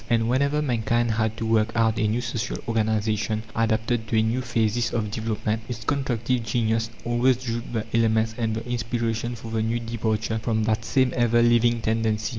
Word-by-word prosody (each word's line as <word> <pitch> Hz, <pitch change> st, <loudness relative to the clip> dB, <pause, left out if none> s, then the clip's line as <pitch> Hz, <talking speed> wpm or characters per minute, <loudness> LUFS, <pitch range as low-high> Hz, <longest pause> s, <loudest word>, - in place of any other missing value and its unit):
And 115 Hz, -1 st, +2 dB
whenever 140 Hz, +4 st, +1 dB
mankind 120 Hz, -2 st, +1 dB
had 110 Hz, 0 st, 0 dB
to 115 Hz, -, -3 dB
work 110 Hz, -1 st, +2 dB
out 115 Hz, -1 st, +2 dB
a 105 Hz, -, +2 dB
new 115 Hz, +3 st, 0 dB
social 120 Hz, 0 st, -3 dB
organization, 110 Hz, -1 st, 0 dB
adapted 110 Hz, 0 st, 0 dB
to 110 Hz, -, 0 dB
a 110 Hz, -, +4 dB
new 115 Hz, +3 st, 0 dB
phasis 115 Hz, -1 st, 0 dB
of 105 Hz, -3 st, -2 dB
development, 110 Hz, 0 st, -2 dB
its 115 Hz, -2 st, -5 dB
constructive 125 Hz, -2 st, 0 dB
genius 115 Hz, 0 st, 0 dB, 0.2 s
always 120 Hz, +1 st, +3 dB
drew 120 Hz, -2 st, -3 dB
the 110 Hz, -3 st, -2 dB
elements 110 Hz, -1 st, +2 dB
and 110 Hz, -2 st, -1 dB
the 115 Hz, +2 st, -5 dB
inspiration 120 Hz, 0 st, -2 dB
for 115 Hz, 0 st, -9 dB
the 110 Hz, -1 st, 0 dB
new 115 Hz, +2 st, 0 dB
departure 110 Hz, -1 st, -2 dB
from 110 Hz, 0 st, 0 dB
that 110 Hz, +1 st, 0 dB
same 130 Hz, +2 st, +2 dB
ever 120 Hz, -1 st, +3 dB
living 120 Hz, 0 st, +3 dB
tendency. 110 Hz, -1 st, 0 dB
115 Hz, 185 wpm, -25 LUFS, 110-120 Hz, 0.2 s, a